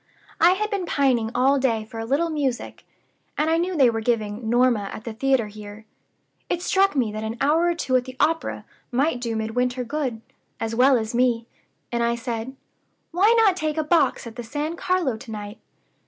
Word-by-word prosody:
I 345 +2 +6
had 425 +3 -2
been 390 -4 -2
pining 255 -7 +2
all 270 +3 +3
day 230 -5 0
for 225 +1 -9
a 225 - -3
little 315 +6 +1
music, 275 -5 -3 0.5
and 310 +2 +1
I 325 - +3
knew 355 0 -1
they 260 -5 +5
were 225 0 -3
giving 220 -1 -1
'Norma' 240 -4 +2
at 215 - -8
the 230 - -6
theater 265 0 +1
here. 210 +1 -10 0.6
It 350 0 -1
struck 390 -2 +2
me 240 -6 +1
that 215 +1 -5
an 220 +2 -4
hour 320 +4 +3
or 345 - +1
two 270 -6 -1
at 250 - -2
the 255 -1 -10
opera 325 +2 0 0.3
might 260 +1 +1
do 230 -2 -2
Midwinter 245 +3 -1
good, 255 -3 -3 0.4
as 225 0 -3
well 255 +3 +5
as 220 0 -3
me; 240 -1 +2 0.5
and 235 -1 -1
I 235 0 +1
said: 235 +1 -5 0.6
'Why 380 +6 +4
not 390 -4 +4
take 310 -3 -2
a 315 - +1
box 305 -5 +2
at 230 +1 -9
the 240 - -5
San 295 +7 -3
Carlo 345 -10 0
to 240 +1 -12
night? 210 0 -7
250 Hz, 200 wpm, -23 LUFS, 225-305 Hz, 0.6 s, I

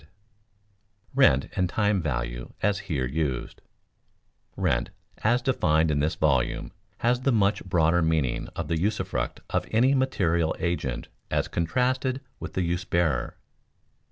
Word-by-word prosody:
[Sidenote: 75 - -23 1.0
Rent 65 +1 +4
and 90 -1 +1
time 105 -1 +1
value - - -3
as 100 -1 +2
here 70 -6 0
used] 70 -1 -3 1.0
Rent - - +1 0.3
as 120 +3 +2
defined 80 -11 +2
in 70 - +1
this 75 +2 +1
volume 65 -5 +1 0.3
has 120 +1 +2
the 135 - +2
much 105 -3 +2
broader 85 -1 +2
meaning 80 -6 0
of 85 - -3
the 80 0 -1
usufruct 105 +4 -1
of - - 0
any 125 +5 +4
material 85 - +1
agent 85 -7 -2 0.2
as - - 0
contrasted 125 +9 0 0.2
with - - -7
the 95 - 0
use 85 +1 -1
bearer. 85 -8 0
85 Hz, 135 wpm, -26 LUFS, 75-105 Hz, 1.0 s, Rent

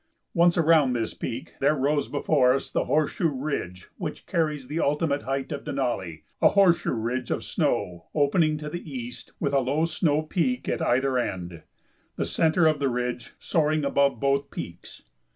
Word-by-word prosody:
Once 170 -1 +4
around 160 -5 +4
this 115 -2 -2
peak, 125 +2 -6
there 145 +3 +3
rose 145 +1 +1
before 140 -3 +3
us 135 - -4
the - - 0
horseshoe 155 +2 +1
ridge 130 - -4
which - - -5
carries 150 -5 -1
the 150 +4 -3
ultimate 145 -1 +1
height 135 +1 -3
of 145 - -4
Denali, 120 - -3 0.2
a - - +7
horseshoe 195 -4 +3
ridge 120 +2 -2
of - - -1
snow 85 -2 -1
opening 155 +1 +3
to 150 0 -6
the 160 0 -6
east 125 -2 -7
with 140 -2 -1
a 140 - +4
low 140 +5 +1
snow 155 -2 +1
peak 220 +11 -1
at - - -1
either 130 +1 +2
end, 90 -7 -4 0.5
the - - -1
centre 165 +1 +2
of 155 -2 +3
the 140 -1 +1
ridge 125 0 -3
soaring 155 -2 +1
above 140 0 +2
both 140 0 +1
peaks. 85 +1 -9
140 Hz, 170 wpm, -26 LUFS, 125-155 Hz, 0.5 s, a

